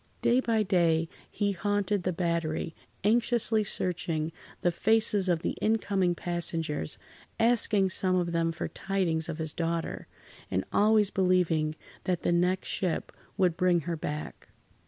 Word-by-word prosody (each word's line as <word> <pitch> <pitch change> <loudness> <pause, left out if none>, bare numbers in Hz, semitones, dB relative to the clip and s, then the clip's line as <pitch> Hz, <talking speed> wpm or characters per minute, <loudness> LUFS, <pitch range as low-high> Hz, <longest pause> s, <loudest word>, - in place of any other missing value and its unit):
Day 245 +2 +4
by 225 -4 +1
day, 170 -4 +2 0.2
he 205 -1 0
haunted 205 +1 0
the 180 - -1
Battery, 170 -2 -1 0.3
anxiously 225 0 +2
searching 170 -5 -1 0.3
the 175 - +2
faces 210 0 +2
of 170 -2 +1
the - - -1
incoming 200 -5 +1
passengers, 165 - -1 0.4
asking 225 -4 +3
some 185 -1 +2
of 175 -1 0
them 165 0 +1
for 165 - -4
tidings 170 -5 -1
of 160 - -4
his 160 -2 -2
daughter, 165 0 -3 0.4
and 95 - -1
always 210 -1 +4
believing 175 -5 +2 0.3
that 180 -2 -1
the - - +2
next 180 +2 +1
ship 180 -4 -2 0.3
would 180 -3 +2
bring 180 -1 +2
her 170 +2 -3
back. 150 -1 -6
180 Hz, 140 wpm, -29 LUFS, 165-200 Hz, 0.4 s, Day